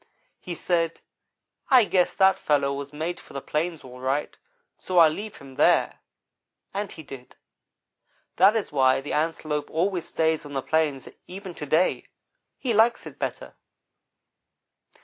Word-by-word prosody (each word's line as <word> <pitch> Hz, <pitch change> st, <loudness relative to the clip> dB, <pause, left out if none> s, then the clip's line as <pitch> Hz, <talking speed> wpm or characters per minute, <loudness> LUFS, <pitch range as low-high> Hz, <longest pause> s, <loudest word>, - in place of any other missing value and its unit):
"He 175 Hz, -, -6 dB
said: 165 Hz, 0 st, 0 dB, 0.7 s
'I 255 Hz, -3 st, +7 dB
guess 185 Hz, -3 st, +1 dB
that 190 Hz, -1 st, +4 dB
fellow 140 Hz, -2 st, +1 dB
was 140 Hz, 0 st, -6 dB
made 160 Hz, +4 st, -4 dB
for -, -, -16 dB
the 140 Hz, -, -3 dB
plains, 160 Hz, +3 st, -2 dB
all 125 Hz, -1 st, -11 dB
right, 135 Hz, +3 st, -2 dB, 0.4 s
so 185 Hz, -, -4 dB
I'll 165 Hz, -2 st, +8 dB
leave 210 Hz, +6 st, -6 dB
him 135 Hz, -1 st, -13 dB
there'; -, -, +3 dB, 0.7 s
and 200 Hz, 0 st, -3 dB
he 160 Hz, -, -10 dB
did. 135 Hz, -3 st, -11 dB, 1.0 s
That 195 Hz, +5 st, +6 dB
is 220 Hz, -6 st, -2 dB
why 130 Hz, -2 st, +3 dB
the 145 Hz, -, -5 dB
Antelope 155 Hz, -1 st, -1 dB
always 175 Hz, +1 st, -1 dB
stays 160 Hz, -1 st, 0 dB
on 145 Hz, -1 st, -10 dB
the 135 Hz, -1 st, -2 dB
plains, 155 Hz, -4 st, 0 dB, 0.2 s
even 190 Hz, 0 st, -8 dB
to 150 Hz, -, -7 dB
day. 160 Hz, +6 st, +1 dB, 0.5 s
He 245 Hz, -4 st, -1 dB
likes 225 Hz, +2 st, +3 dB
it -, -, -11 dB
better. -, -, -4 dB
160 Hz, 150 wpm, -25 LUFS, 145-185 Hz, 1.0 s, I'll